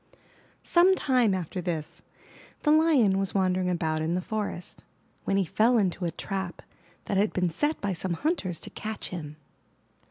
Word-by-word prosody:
Some 360 Hz, +2 st, +5 dB
time 250 Hz, -, +2 dB
after 180 Hz, 0 st, -4 dB
this, 165 Hz, -4 st, -4 dB, 0.6 s
the 300 Hz, -, +4 dB
Lion 295 Hz, -12 st, +4 dB
was 195 Hz, 0 st, -2 dB
wandering 185 Hz, -1 st, +2 dB
about 160 Hz, -3 st, 0 dB
in 165 Hz, +2 st, 0 dB
the -, -, +1 dB
forest, 205 Hz, -4 st, -4 dB, 0.4 s
when 195 Hz, -, +1 dB
he 195 Hz, -, +2 dB
fell 230 Hz, +8 st, +3 dB
into 190 Hz, -3 st, 0 dB
a -, -, +1 dB
trap 190 Hz, -1 st, -5 dB, 0.4 s
that 200 Hz, -, -1 dB
had 205 Hz, +2 st, +2 dB
been 180 Hz, -2 st, +1 dB
set 295 Hz, -, 0 dB
by 200 Hz, -1 st, -1 dB
some 180 Hz, 0 st, -2 dB
hunters 200 Hz, -, -1 dB
to -, -, -8 dB
catch 220 Hz, 0 st, -5 dB
him. 155 Hz, -4 st, -6 dB
190 Hz, 165 wpm, -27 LUFS, 175-220 Hz, 0.6 s, Some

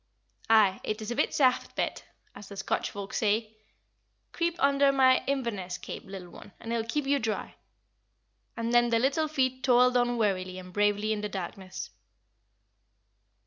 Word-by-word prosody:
"Aye, 215 Hz, -4 st, +5 dB
it 215 Hz, +1 st, -3 dB
is 215 Hz, +1 st, -5 dB
a -, -, -2 dB
bit -, -, +1 dB
saft, 255 Hz, -3 st, +2 dB
Bet -, -, -2 dB, 0.3 s
as 200 Hz, -, -11 dB
the 200 Hz, -, -9 dB
Scotch 190 Hz, -, -1 dB
folk 200 Hz, 0 st, -7 dB
say. 215 Hz, 0 st, 0 dB, 0.8 s
Creep 340 Hz, 0 st, -1 dB
under 280 Hz, -2 st, +4 dB
my 260 Hz, -1 st, +4 dB
Inverness 220 Hz, -10 st, -2 dB
cape, -, -, -8 dB
little 190 Hz, -2 st, -9 dB
one, 200 Hz, -, -13 dB
and 230 Hz, -, -5 dB
it -, -, +1 dB
will 225 Hz, -, -1 dB
keep 295 Hz, +3 st, -1 dB
you 280 Hz, +1 st, +2 dB
dry." 220 Hz, -3 st, -3 dB, 1.0 s
And 230 Hz, +1 st, -2 dB
then 240 Hz, 0 st, +5 dB
the 230 Hz, -, +3 dB
little 275 Hz, +6 st, +1 dB
feet 260 Hz, -4 st, 0 dB
toiled 250 Hz, 0 st, +4 dB
on 245 Hz, 0 st, +2 dB
wearily 185 Hz, -4 st, -1 dB
and 180 Hz, -1 st, -10 dB
bravely 205 Hz, +1 st, +1 dB
in 210 Hz, -, -3 dB
the 210 Hz, -, -3 dB
darkness. 190 Hz, 0 st, -6 dB
225 Hz, 170 wpm, -28 LUFS, 200-260 Hz, 1.0 s, Aye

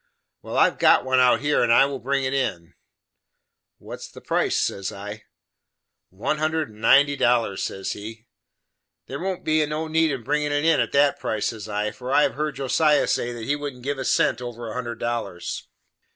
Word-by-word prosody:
"Well, -, -, -5 dB
I -, -, +6 dB
have -, -, -2 dB
got -, -, +5 dB
one 130 Hz, 0 st, +2 dB
out 125 Hz, +1 st, +4 dB
here, 150 Hz, +1 st, +2 dB
and 120 Hz, -, +2 dB
I 120 Hz, -, +6 dB
will 140 Hz, -1 st, -4 dB
bring 135 Hz, +2 st, -1 dB
it 130 Hz, 0 st, -1 dB
in." 90 Hz, -11 st, -2 dB, 1.0 s
"What -, -, -9 dB
is -, -, -9 dB
the -, -, -13 dB
price?" -, -, 0 dB
says 100 Hz, -1 st, -2 dB
I. 105 Hz, +2 st, -8 dB, 0.8 s
"One 105 Hz, +11 st, -2 dB
hundred 155 Hz, -1 st, -1 dB
and 105 Hz, 0 st, -16 dB
ninety 145 Hz, +5 st, +5 dB
dollars," 120 Hz, -7 st, +1 dB
says 95 Hz, -, -3 dB
he. 110 Hz, +3 st, -8 dB, 0.8 s
"There 140 Hz, -, -6 dB
won't 185 Hz, 0 st, -3 dB
be 155 Hz, 0 st, +3 dB
no 155 Hz, +2 st, -3 dB
need 160 Hz, 0 st, +2 dB
of 130 Hz, -4 st, -4 dB
bringin' 150 Hz, +3 st, 0 dB
it 145 Hz, +1 st, 0 dB
in 165 Hz, -2 st, +4 dB
at -, -, 0 dB
that 140 Hz, 0 st, +3 dB
price," 110 Hz, -1 st, -1 dB
says 110 Hz, -2 st, -8 dB
I, 105 Hz, +1 st, -1 dB
"for 125 Hz, +2 st, -7 dB
I 145 Hz, -, +5 dB
have -, -, +1 dB
heerd 150 Hz, 0 st, -3 dB
Josiah 145 Hz, +2 st, +2 dB
say, 120 Hz, -, -1 dB
that 120 Hz, -2 st, -7 dB
he 145 Hz, -, +1 dB
wouldn't 145 Hz, -4 st, -7 dB
give 140 Hz, +1 st, -3 dB
a -, -, -2 dB
cent 125 Hz, -, +1 dB
over 120 Hz, -1 st, -6 dB
a 110 Hz, -, -6 dB
hundred 120 Hz, -2 st, -4 dB
dollars." 115 Hz, -7 st, -4 dB
130 Hz, 210 wpm, -23 LUFS, 115-145 Hz, 1.0 s, I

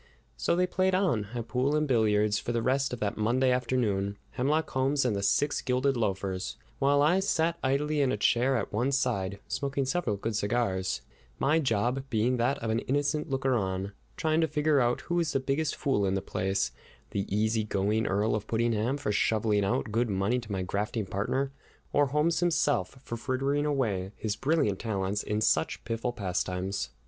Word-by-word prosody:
So -, -, +1 dB
they 180 Hz, +1 st, +3 dB
played 185 Hz, +1 st, +1 dB
on, 170 Hz, -, +1 dB
at 115 Hz, -1 st, -4 dB
pool 130 Hz, +4 st, +1 dB
and 150 Hz, 0 st, +1 dB
billiards, 105 Hz, -4 st, +2 dB
for -, -, -3 dB
the 115 Hz, -1 st, -1 dB
rest 135 Hz, +2 st, +1 dB
of 125 Hz, -, -4 dB
that 105 Hz, -1 st, -1 dB
Monday 125 Hz, +4 st, +2 dB
afternoon, 115 Hz, -6 st, 0 dB
Hemlock 145 Hz, +6 st, 0 dB
Holmes 135 Hz, +1 st, +1 dB
and 115 Hz, -4 st, +1 dB
the 100 Hz, -, -2 dB
six 145 Hz, +9 st, +1 dB
gilded 130 Hz, +1 st, +1 dB
loafers, 95 Hz, -4 st, -2 dB, 0.2 s
while 140 Hz, +1 st, +4 dB
I 175 Hz, +6 st, +4 dB
sat 170 Hz, -3 st, +1 dB
idly 145 Hz, +3 st, +1 dB
in 135 Hz, -2 st, +2 dB
a -, -, 0 dB
chair 125 Hz, +5 st, +2 dB
at 105 Hz, -, -4 dB
one 120 Hz, +6 st, +1 dB
side, 100 Hz, -7 st, 0 dB
smoking 140 Hz, -1 st, -1 dB
several 140 Hz, -6 st, 0 dB
good 110 Hz, +2 st, -3 dB
cigars, 100 Hz, -3 st, 0 dB, 0.3 s
my 150 Hz, +4 st, +3 dB
job 125 Hz, -1 st, 0 dB
being 120 Hz, +2 st, +1 dB
that 120 Hz, +4 st, +1 dB
of 110 Hz, -, 0 dB
an 110 Hz, -, +1 dB
innocent 145 Hz, +4 st, -1 dB
looker 135 Hz, -1 st, +1 dB
on, 95 Hz, -3 st, -1 dB, 0.3 s
trying 160 Hz, 0 st, +1 dB
to 160 Hz, -, +3 dB
figure 150 Hz, -1 st, +2 dB
out 120 Hz, -1 st, +1 dB
who 175 Hz, -, -5 dB
was 165 Hz, -3 st, 0 dB
the -, -, +2 dB
biggest 140 Hz, +3 st, -1 dB
fool 105 Hz, -9 st, +1 dB
in 95 Hz, -, +1 dB
the 95 Hz, -, -1 dB
place, 95 Hz, -8 st, -1 dB, 0.4 s
the 100 Hz, 0 st, -2 dB
easy 110 Hz, +2 st, +1 dB
going 105 Hz, +2 st, 0 dB
Earl 105 Hz, +3 st, +1 dB
of 110 Hz, 0 st, -2 dB
Puddingham, 115 Hz, +3 st, 0 dB
for 140 Hz, -, -2 dB
shoveling 105 Hz, 0 st, +2 dB
out 115 Hz, +2 st, -1 dB
good 115 Hz, +2 st, +1 dB
money 100 Hz, +5 st, +1 dB
to 115 Hz, -3 st, -10 dB
my 95 Hz, -2 st, -1 dB
grafting 105 Hz, +4 st, -2 dB
partner, 130 Hz, +8 st, -1 dB, 0.4 s
or 145 Hz, 0 st, +4 dB
Holmes 150 Hz, +4 st, +1 dB
himself, 145 Hz, -, +1 dB
for 115 Hz, -, -5 dB
frittering 135 Hz, +4 st, 0 dB
away 105 Hz, -9 st, -1 dB
his 105 Hz, -2 st, -2 dB
brilliant 135 Hz, -10 st, +1 dB
talents 100 Hz, -2 st, -1 dB
in 105 Hz, +1 st, -2 dB
such -, -, +1 dB
piffle 115 Hz, +1 st, -2 dB
pastimes. 90 Hz, -, -2 dB
120 Hz, 190 wpm, -29 LUFS, 105-140 Hz, 0.4 s, while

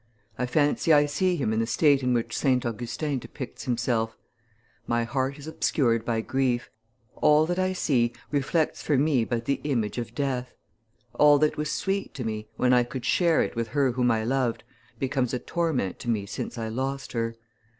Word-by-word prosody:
I 125 Hz, +2 st, -2 dB
fancy 145 Hz, +4 st, +2 dB
I 145 Hz, -1 st, +6 dB
see 180 Hz, +5 st, +1 dB
him 120 Hz, -9 st, 0 dB
in 110 Hz, -, +1 dB
the 115 Hz, -, 0 dB
state 140 Hz, +4 st, +3 dB
in 125 Hz, -1 st, +1 dB
which 120 Hz, -1 st, 0 dB
St. 130 Hz, -4 st, +1 dB
Augustin 120 Hz, +5 st, -2 dB
depicts 130 Hz, +1 st, -8 dB
himself: 115 Hz, -2 st, -1 dB, 0.7 s
'My 120 Hz, 0 st, +1 dB
heart 130 Hz, +3 st, -2 dB
is 145 Hz, -, -10 dB
obscured 120 Hz, -7 st, +1 dB
by 115 Hz, -2 st, 0 dB
grief. 130 Hz, 0 st, -1 dB, 0.5 s
All 150 Hz, +1 st, +5 dB
that 175 Hz, +2 st, -1 dB
I 185 Hz, 0 st, +1 dB
see 120 Hz, -9 st, +1 dB, 0.2 s
reflects 150 Hz, +3 st, 0 dB
for 145 Hz, -, +1 dB
me 135 Hz, -4 st, +2 dB
but 115 Hz, -1 st, -2 dB
the 140 Hz, -, -1 dB
image 120 Hz, -7 st, -1 dB
of 120 Hz, 0 st, -6 dB
death. 130 Hz, -2 st, -2 dB, 0.6 s
All 150 Hz, 0 st, +6 dB
that 150 Hz, +1 st, +2 dB
was 150 Hz, 0 st, -2 dB
sweet 195 Hz, -3 st, -2 dB
to 130 Hz, -, -4 dB
me, 110 Hz, -1 st, -4 dB
when 125 Hz, 0 st, +3 dB
I 125 Hz, -, +6 dB
could 125 Hz, +1 st, -6 dB
share 170 Hz, -3 st, +3 dB
it -, -, -5 dB
with 115 Hz, 0 st, -1 dB
her 135 Hz, +1 st, +1 dB
whom 125 Hz, 0 st, +1 dB
I 110 Hz, -1 st, +1 dB
loved, 125 Hz, -1 st, 0 dB, 0.3 s
becomes 130 Hz, -2 st, -1 dB
a -, -, -2 dB
torment 160 Hz, -, -1 dB
to 120 Hz, -, -5 dB
me 105 Hz, -4 st, 0 dB
since 100 Hz, -, -5 dB
I 115 Hz, -1 st, -3 dB
lost 135 Hz, +4 st, -3 dB
her. 115 Hz, -1 st, -2 dB
130 Hz, 190 wpm, -26 LUFS, 115-145 Hz, 0.7 s, I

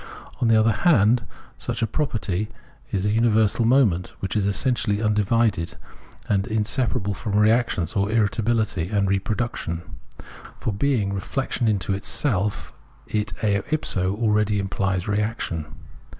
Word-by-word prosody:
On 120 Hz, -, +3 dB
the 115 Hz, -1 st, +5 dB
other 110 Hz, +1 st, +4 dB
hand, 120 Hz, -, +3 dB, 0.3 s
such 115 Hz, -1 st, -3 dB
a -, -, +4 dB
property 110 Hz, -, -2 dB, 0.4 s
is 95 Hz, 0 st, -1 dB
a 105 Hz, -, +2 dB
universal 110 Hz, 0 st, +3 dB
moment, 115 Hz, -8 st, +2 dB
which 95 Hz, +1 st, -3 dB
is 100 Hz, -2 st, +1 dB
essentially 105 Hz, -1 st, 0 dB
undivided, 105 Hz, -3 st, +1 dB, 0.5 s
and 100 Hz, -1 st, +1 dB
inseparable 105 Hz, -2 st, 0 dB
from 105 Hz, +1 st, -4 dB
reaction, 110 Hz, -3 st, +3 dB
or 100 Hz, 0 st, +1 dB
irritabihty, 110 Hz, -3 st, 0 dB
and 100 Hz, -2 st, +1 dB
reproduc 105 Hz, +5 st, -1 dB
tion. 85 Hz, +1 st, -4 dB, 0.7 s
For, 110 Hz, -, -2 dB
being 105 Hz, -3 st, 0 dB
reflection 120 Hz, +4 st, -2 dB
into 100 Hz, -2 st, +1 dB
self, 105 Hz, -6 st, -1 dB, 0.3 s
it 105 Hz, -1 st, -2 dB
eo 100 Hz, -2 st, +2 dB
ipso 95 Hz, -11 st, 0 dB
already 105 Hz, -1 st, +1 dB
implies 95 Hz, -2 st, -1 dB
reaction. 105 Hz, -6 st, -2 dB
105 Hz, 130 wpm, -23 LUFS, 100-115 Hz, 0.7 s, the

